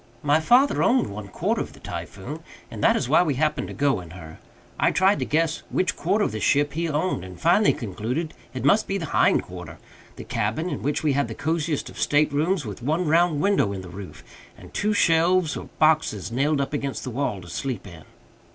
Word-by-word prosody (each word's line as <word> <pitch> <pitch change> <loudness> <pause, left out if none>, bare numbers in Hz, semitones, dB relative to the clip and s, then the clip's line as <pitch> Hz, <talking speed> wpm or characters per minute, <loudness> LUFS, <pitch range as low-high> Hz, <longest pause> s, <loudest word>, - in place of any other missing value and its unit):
My 145 +1 +3
father 245 - +4
owned 255 - +2
one 100 0 -7
quarter 95 - -1
of - - -6
the - - -15
Typhoon, - - -7 0.3
and - - -6
that - - +5
is - - -1
why 150 - +5
we 155 -6 0
happened 150 +2 0
to - - -7
go 140 -8 +1
in 85 - -12
her. 80 -2 -11 0.4
I - - +4
tried 190 +2 +3
to - - -1
guess 160 +1 0
which 185 - 0
quarter 200 +6 +1
of - - -2
the 110 - -4
ship 145 +5 +2
he 165 +1 -1
owned, 150 - -1
and 90 -1 -10
finally 180 +6 +4
concluded 120 - -4 0.2
it 130 0 -5
must 205 +10 +4
be 195 - -1
the 170 - -4
hind - - +3
quarter - - -9 0.4
the - - -8
cabin, 135 +13 -2
in 145 - -4
which 145 +2 -1
we 150 -3 +2
had 140 +1 +1
the - - -7
cosiest 160 -1 -1
of - - -10
state 150 0 +2
rooms, 160 +2 +1
with 105 0 -7
one 155 +7 0
round 165 -1 +3
window 195 - +2
in 95 - -5
the 90 - -10
roof, 95 +1 -10 0.3
and - - -14
two 210 - 0
shelves 170 -1 +3
or - - -7
boxes 155 - +2
nailed 140 +4 +1
up 140 - -3
against 140 -2 -3
the 130 - -5
wall 120 -5 -2
to 85 - -12
sleep 120 +4 -4
in. 85 -5 -11
150 Hz, 225 wpm, -24 LUFS, 115-165 Hz, 0.4 s, that